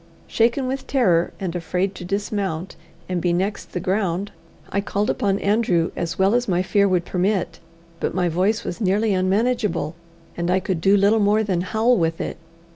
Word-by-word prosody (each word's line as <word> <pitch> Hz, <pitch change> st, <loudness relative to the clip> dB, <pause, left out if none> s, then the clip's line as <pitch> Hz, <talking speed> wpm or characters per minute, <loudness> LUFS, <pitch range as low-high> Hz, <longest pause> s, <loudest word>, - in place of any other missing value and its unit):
Shaken 235 Hz, +4 st, +1 dB
with 265 Hz, +1 st, -3 dB
terror, 180 Hz, -11 st, +2 dB
and 180 Hz, -3 st, -3 dB
afraid 180 Hz, +3 st, -1 dB
to -, -, -9 dB
dismount 195 Hz, -2 st, -3 dB, 0.3 s
and 180 Hz, -2 st, -2 dB
be 175 Hz, -, +1 dB
next 190 Hz, +4 st, -2 dB
the 180 Hz, -, -1 dB
ground, 190 Hz, +1 st, -1 dB, 0.4 s
I 200 Hz, -, 0 dB
called 205 Hz, +1 st, 0 dB
upon 200 Hz, -1 st, 0 dB
Andrew 200 Hz, -5 st, +1 dB
as 170 Hz, -1 st, -3 dB
well 195 Hz, +2 st, +3 dB
as 245 Hz, 0 st, +1 dB
my 180 Hz, -1 st, +1 dB
fear 200 Hz, +2 st, +3 dB
would 180 Hz, -2 st, +1 dB
permit; 190 Hz, +1 st, -1 dB, 0.4 s
but -, -, -2 dB
my 180 Hz, -1 st, +1 dB
voice 195 Hz, +7 st, +1 dB
was 180 Hz, -, -5 dB
nearly 205 Hz, +2 st, +2 dB
unmanageable, 200 Hz, -2 st, 0 dB, 0.4 s
and 170 Hz, 0 st, -2 dB
I 185 Hz, +1 st, +3 dB
could 185 Hz, -3 st, -2 dB
do 195 Hz, +3 st, +5 dB
little 205 Hz, +3 st, +4 dB
more 210 Hz, +1 st, +3 dB
than 185 Hz, -4 st, 0 dB
howl 225 Hz, +6 st, +2 dB
with 165 Hz, -2 st, 0 dB
it. -, -, -4 dB
195 Hz, 185 wpm, -22 LUFS, 180-210 Hz, 0.4 s, do